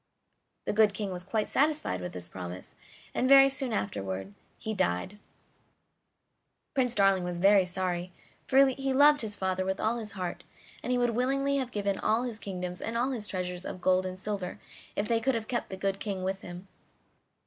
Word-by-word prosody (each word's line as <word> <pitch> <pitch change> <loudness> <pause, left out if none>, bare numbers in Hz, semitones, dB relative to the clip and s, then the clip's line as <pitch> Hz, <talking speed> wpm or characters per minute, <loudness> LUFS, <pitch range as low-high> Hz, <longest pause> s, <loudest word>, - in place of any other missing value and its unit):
The - - 0
good 210 -1 +4
King 205 -3 -3
was 180 -1 -5
quite 210 +3 -1
satisfied 295 - +1
with 90 - -5
this 90 -1 -5
promise; 90 0 -7 0.4
and 255 - +1
very 275 0 +9
soon 265 -2 -1
afterward 95 - -3 0.2
he 220 - -4
died. 190 - -1 1.5
Prince 250 -4 +1
Darling 195 -2 +4
was 175 -1 -3
very 195 +1 +5
sorry, 180 -1 -2 0.4
for 270 +1 +6
he 270 +1 -1
loved 290 +2 +6
his 215 -2 -3
father 190 -1 -1
with 190 +1 -2
all 225 +2 +1
his 215 -3 -5
heart, 180 -3 -4 0.4
and - - -3
he 250 - +3
would 245 -1 +2
willingly 275 +4 +1
have 260 -3 -1
given 200 -3 -1
all 220 +3 +2
his 235 -3 -4
kingdoms 180 -3 -5
and 230 +1 -2
all 250 +3 +1
his 220 -5 -3
treasures 180 -1 -4
of 185 - -6
gold 185 +1 +2
and 185 0 -7
silver 195 -2 -4 0.4
if 205 - -1
they 230 -1 +2
could 265 +2 +1
have 225 -1 -3
kept 240 -2 -2
the 190 - -6
good 195 0 -1
King 195 -3 -3
with 190 +1 -2
him. 175 +2 -9
200 Hz, 190 wpm, -29 LUFS, 185-240 Hz, 1.5 s, very